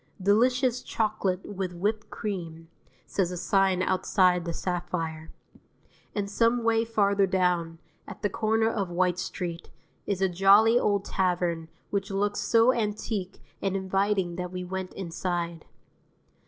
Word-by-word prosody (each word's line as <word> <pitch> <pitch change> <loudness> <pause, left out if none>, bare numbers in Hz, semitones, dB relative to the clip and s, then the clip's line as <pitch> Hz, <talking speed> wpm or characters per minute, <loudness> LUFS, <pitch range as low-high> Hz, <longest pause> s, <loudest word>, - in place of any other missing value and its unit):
"Delicious 245 +6 +2
Chocolate 205 -4 -1
with 190 -3 -4
Whipped 210 +5 -2
Cream," 165 -6 -5 0.4
says 185 -3 0
a 180 - -5
sign 185 +1 +2
outside 185 -1 +2
the 170 - -2
Sapphire. 165 -2 -3 0.9
And 205 -2 -1
some 230 +3 +2
way 225 0 +3
farther 200 -3 +2
down 180 -3 0 0.3
(at - - -10
the - - +4
corner 220 +1 +1
of 205 -5 -1
White 180 0 +1
Street) 175 -2 -5 0.4
is 200 -2 -1
a 190 - +3
jolly 200 +6 +5
old 200 -3 +1
tavern 175 -3 0 0.2
which 200 0 -1
looked 205 +1 0
so 230 +2 +4
antique 210 -3 -3 0.2
and 195 -1 -1
inviting 190 -2 0
that 180 0 -4
we 180 0 -4
went 185 0 -5
inside. 170 -2 -3
190 Hz, 135 wpm, -27 LUFS, 180-210 Hz, 0.9 s, jolly